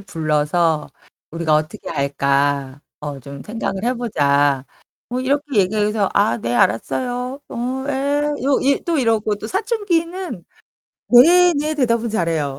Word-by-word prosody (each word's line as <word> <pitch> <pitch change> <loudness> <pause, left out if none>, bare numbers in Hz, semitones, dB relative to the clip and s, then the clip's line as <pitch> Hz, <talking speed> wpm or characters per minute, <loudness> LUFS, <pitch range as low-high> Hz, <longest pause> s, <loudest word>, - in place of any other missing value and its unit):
불러서 160 -2 0 0.4
"우리가 165 -1 0
어떻게 155 +2 -2
할까? 140 -1 0 0.2
어 145 -2 -5
좀 140 +2 -10
생각을 215 -2 -4
해 250 +2 +1
보자." 145 - +1 0.4
뭐 250 +1 -2
이렇게 280 0 -1
얘기해서 210 +1 +1
"아 200 - +3
네, 120 +1 -2
알았어요. 250 - 0
어 255 +3 -3
에." 285 +1 0 0.2
요 275 -1 +3
이 275 +1 +1
또 335 - +1
이러고 225 -5 +1
또 215 - -7
사춘기는 360 - -2 0.6
"네. 350 +9 +7
네." 305 +1 -1
대답은 235 -5 +1
잘해요. 160 -8 -1
215 Hz, 260 characters per minute, -20 LUFS, -, 0.6 s, 네